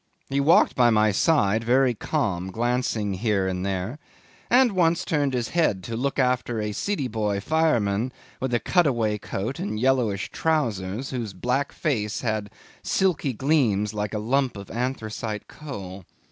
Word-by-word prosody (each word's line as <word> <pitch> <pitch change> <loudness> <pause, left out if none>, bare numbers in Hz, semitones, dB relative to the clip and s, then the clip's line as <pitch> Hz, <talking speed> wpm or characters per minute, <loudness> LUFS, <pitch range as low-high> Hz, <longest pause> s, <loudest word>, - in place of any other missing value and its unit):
He 140 - +1
walked 145 +4 +5
by 120 -1 +5
my 110 -1 +4
side 110 -2 +2
very 125 +2 +3
calm, 100 - -2
glancing 115 -2 -1
here 100 -1 0
and 90 -1 -2
there, 95 +8 -3 0.5
and 250 -1 +5
once 170 -3 +2
turned 145 -4 0
his 120 -3 -1
head 155 - +1
to 115 - -5
look 135 +4 -1
after 125 -3 +1
a 105 0 -2
Sidiboy 110 - -1
fireman 120 -5 +1 0.3
in 130 -2 0
a - - +2
cutaway 120 - +1
coat 110 +9 -4
and 180 - -3
yellowish 120 -6 +1
trousers, 120 -7 -1
whose 115 -6 -4
black 125 +9 -1
face 110 -9 -1
had 110 -3 -2 0.3
silky 180 -8 +1
gleams 115 -7 +1
like 105 0 -3
a - - 0
lump 125 +2 0
of 100 -1 -9
anthracite 110 -3 -3
coal. 100 - -8
120 Hz, 150 wpm, -25 LUFS, 105-140 Hz, 0.5 s, walked